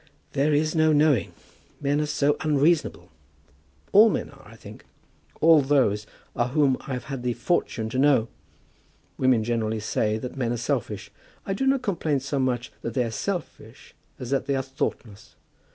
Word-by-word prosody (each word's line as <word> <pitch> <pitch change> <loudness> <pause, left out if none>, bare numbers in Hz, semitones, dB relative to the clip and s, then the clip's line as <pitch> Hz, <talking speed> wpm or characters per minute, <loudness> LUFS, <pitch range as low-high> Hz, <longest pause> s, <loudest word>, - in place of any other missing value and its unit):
"There 140 +3 +2
is 155 +1 +1
no 155 -1 +3
knowing. 150 -6 +3 0.5
Men 145 +1 0
are 150 - -1
so 145 0 +1
unreasonable. 155 +2 +1 0.8
All 215 +3 +7
men - - -3
are, - - -17
I - - -14
think. - - -13 0.6
All 160 -2 +6
those 130 -7 +1 0.3
are 120 - +1
whom 140 0 +2
I 135 - -3
have 125 - -4
had 135 -3 -6
the 125 -1 -1
fortune 120 -4 -1
to 130 - -2
know. 135 -5 +4 0.9
Women 130 -4 +3
generally 110 -1 -1
say 105 0 -1
that 125 +4 -7
men 125 -3 -1
are - - -2
selfish. 115 - -3 0.3
I 195 - -2
do 270 +7 -1
not 270 -1 +2
complain 160 - 0
so 135 +1 -3
much 125 -2 -1
that 115 - -5
they 125 - +2
are 115 - -4
selfish 140 - -6 0.2
as 125 -1 -7
that 135 - 0
they 140 - +1
are 135 - -1
thoughtless. 115 -5 -5
135 Hz, 175 wpm, -25 LUFS, 120-150 Hz, 0.9 s, All